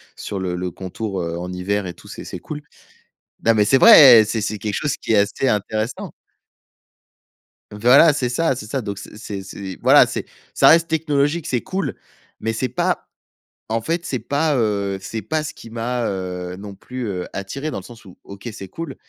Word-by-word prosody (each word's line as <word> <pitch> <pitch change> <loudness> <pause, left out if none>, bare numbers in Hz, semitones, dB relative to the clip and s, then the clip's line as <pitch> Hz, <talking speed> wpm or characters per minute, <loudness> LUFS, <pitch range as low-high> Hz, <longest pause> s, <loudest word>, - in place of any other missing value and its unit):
sur 100 - -5
le 90 -1 -2
le 90 0 -3
contour, 95 +2 -5
heu, 85 0 -3
en 90 +1 -5
hiver 95 +2 -2
et 85 - -6
tout, - - -17
c'est - - -8
c'est - - -7
cool. 150 -1 -7 0.9
Non 115 - +6
mais 105 -1 +4
c'est 135 +6 +4
vrai! 130 - +9
C'est 110 +1 -2
c'est 110 0 -3
quelque 105 0 -3
chose 145 +5 -1
qui - - -2
est - - +4
assez 100 +6 +1
intéressant. 110 +2 -2 1.6
Voilà, 125 +10 +6
c'est 135 -4 -1
ça, 135 +4 +1
c'est 120 - -7
ça, 135 +1 -2
donc 100 -2 -5
c'est 100 - -11
c'est 100 -3 -6
c'est 95 0 -8
voilà, - - +7
c'est - - -4 0.3
ça - - +5
reste 165 +1 +5
technologique, 155 0 0
c'est 125 -2 0
cool 190 +1 -3 0.5
mais 115 - -1
c'est 130 +3 -1
pas 125 - -1 0.6
en 115 +1 0
fait, 170 +6 -2
c'est 130 - -2
pas, 145 +6 0
heu, 100 -4 0
c'est 110 +4 -5
pas 155 0 -1
ce 155 0 -6
qui 115 - -13
m'a, 120 +1 -2
heu, 90 -2 -4
non 100 0 -9
plus, 125 +4 -6
heu, 90 -3 -3
attiré 135 +11 -4
dans - - -4
le - - -12
sens 115 +3 -14
où, 95 - -14
OK, 100 +3 -10
c'est 100 -3 -9
cool 155 - -7
110 Hz, 205 wpm, -21 LUFS, 100-135 Hz, 1.6 s, vrai